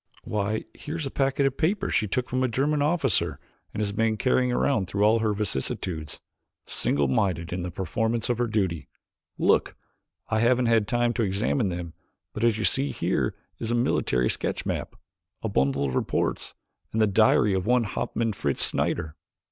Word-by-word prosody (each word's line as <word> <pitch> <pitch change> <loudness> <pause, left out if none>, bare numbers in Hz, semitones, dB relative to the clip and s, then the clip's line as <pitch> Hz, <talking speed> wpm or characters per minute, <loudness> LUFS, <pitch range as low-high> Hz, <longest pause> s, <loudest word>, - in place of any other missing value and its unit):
"Why, 105 +1 -2
here's 155 0 -5
a 135 - -4
packet 135 0 +1
of 135 -1 0
papers 195 +5 0
she 110 - +2
took 125 +5 -1
from 130 +1 -1
a 130 - +3
German 140 +5 0
officer 150 -3 +1 0.3
and 105 - -4
has 105 -1 0
been 110 +1 +1
carrying 125 +1 +2
it 125 -3 +1
through 100 +2 0
all 110 +2 +5
her 110 -1 +1
vicissitudes 85 -4 -2 0.5
single 70 0 +1
minded 85 +2 0
in 90 - -2
the 90 - -3
performance 110 +6 -1
of 120 -1 0
her 120 - +1
duty. 95 - -1 0.5
Look! - - +2 0.5
I 110 - +1
haven't 120 +2 +3
yet 115 - +3
had 110 -3 +3
time 120 +1 +1
to 120 - -1
examine 105 +3 0
them 85 -2 -5 0.4
but 105 - -4
as 115 -2 +3
you 110 - -1
see 135 +2 +2
here - - -1 0.2
is 115 - -3
a 120 - +1
military 65 - +1
sketch - - -2
map, - - -3 0.5
a 110 - -1
bundle 70 -5 +1
of 65 - -2
reports, - - -1 0.4
and 110 - -1
the 110 - +5
diary 105 0 +4
of 95 +1 -1
one 125 0 +4
Hauptmann 115 +1 -2
Fritz 70 -8 0
Schneider." 75 -1 -1
110 Hz, 185 wpm, -26 LUFS, 95-125 Hz, 0.5 s, all